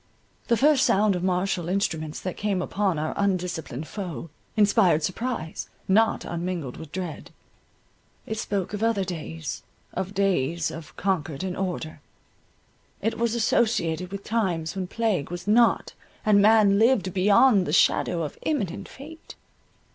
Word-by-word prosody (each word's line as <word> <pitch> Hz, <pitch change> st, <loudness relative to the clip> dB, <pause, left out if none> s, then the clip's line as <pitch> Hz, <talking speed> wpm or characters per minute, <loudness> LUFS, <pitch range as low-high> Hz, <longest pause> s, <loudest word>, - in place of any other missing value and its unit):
The 235 Hz, -, +3 dB
first 285 Hz, 0 st, +4 dB
sound 205 Hz, 0 st, +3 dB
of 180 Hz, -, -2 dB
martial 180 Hz, -2 st, 0 dB
instruments 160 Hz, -5 st, -1 dB
that 185 Hz, -, -4 dB
came 200 Hz, -2 st, -1 dB
upon 190 Hz, -1 st, 0 dB
our 155 Hz, +1 st, -2 dB
undisciplined 180 Hz, -7 st, -2 dB
foe, 170 Hz, -, -6 dB, 0.3 s
inspired 200 Hz, -6 st, +4 dB
surprise, 185 Hz, -2 st, -3 dB, 0.2 s
not 220 Hz, +4 st, +3 dB
unmingled 170 Hz, -6 st, -4 dB
with 160 Hz, -2 st, -10 dB
dread. 180 Hz, -3 st, -5 dB, 1.0 s
It 220 Hz, 0 st, -4 dB
spoke 200 Hz, -3 st, -2 dB
of 205 Hz, -, -3 dB
other 225 Hz, -3 st, +2 dB
days, 155 Hz, -, -5 dB, 0.3 s
of 190 Hz, +2 st, -4 dB
days 170 Hz, -5 st, +1 dB
of 160 Hz, -1 st, -10 dB
concord 165 Hz, -6 st, -1 dB
and 185 Hz, -1 st, -3 dB
order; 170 Hz, -5 st, -4 dB, 1.0 s
it 225 Hz, +2 st, -2 dB
was 235 Hz, 0 st, +1 dB
associated 200 Hz, -7 st, +1 dB
with 200 Hz, 0 st, -6 dB
times 180 Hz, -8 st, -1 dB
when 190 Hz, -1 st, -3 dB
plague 210 Hz, -7 st, -1 dB
was 175 Hz, +2 st, -7 dB
not, 230 Hz, +2 st, +3 dB, 0.3 s
and 205 Hz, -2 st, +5 dB
man 210 Hz, -1 st, +5 dB
lived 220 Hz, -6 st, +3 dB
beyond 200 Hz, +1 st, +4 dB
the -, -, -1 dB
shadow 170 Hz, -1 st, +3 dB
of 150 Hz, -, -6 dB
imminent 205 Hz, -, -2 dB
fate. 320 Hz, +4 st, -12 dB
190 Hz, 140 wpm, -25 LUFS, 170-215 Hz, 1.0 s, and